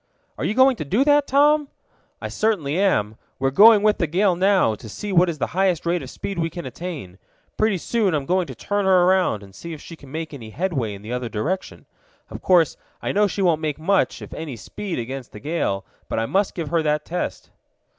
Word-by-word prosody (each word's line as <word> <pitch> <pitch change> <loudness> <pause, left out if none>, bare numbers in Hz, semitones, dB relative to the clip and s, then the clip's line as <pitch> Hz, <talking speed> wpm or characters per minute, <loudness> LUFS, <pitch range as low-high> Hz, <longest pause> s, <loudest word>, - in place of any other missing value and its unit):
"Are - - -1
you 215 - -1
going 260 -1 +5
to - - -3
do 200 - +2
that, 290 0 +4
Tom?" 295 +2 +4 0.5
"I - - -4
certainly 180 -8 0
am. 110 - +1 0.2
We're 135 0 0
going 210 +6 +7
with 210 -1 +3
the 170 - +1
gale 185 +4 +2
now, 190 - +3
to 110 +1 -9
see 205 - -5
what 180 0 +5
is 165 - -4
the - - 0
highest 185 -3 +1
rate 170 +1 +1
of - - -8
speed 195 -3 -5
we 165 0 0
can 175 +2 -7
attain. 130 - -7 0.4
Pretty 215 -3 +1
soon 200 -1 0
I'm 145 -2 -2
going 180 +2 +1
to - - -8
turn 205 -1 -1
her 185 -2 +5
around, 180 - +2
and 95 -1 -14
see 170 - -8
if 155 - -8
she 165 - -10
can 140 -4 -15
make 160 0 -5
any 115 -6 -8
headway 135 - -2
in 100 - -12
the 115 +3 -5
other 125 -1 -3
direction. 155 - -3 0.5
Of - - -7
course 175 -5 +3 0.2
I - - -2
know 210 +1 +3
she 200 0 -2
won't 165 -4 +2
make 150 -3 -2
much, 185 +5 +1
if - - -10
any 155 -5 -6
speed, 180 - -6
against 130 +2 -6
the 105 - -9
gale; 145 - -2 0.2
but - - -2
I 115 - +1
must 195 - 0
give 165 -4 -4
her 165 -1 +2
that 150 -1 0
test." 175 +2 -4
170 Hz, 230 wpm, -22 LUFS, 135-195 Hz, 0.5 s, going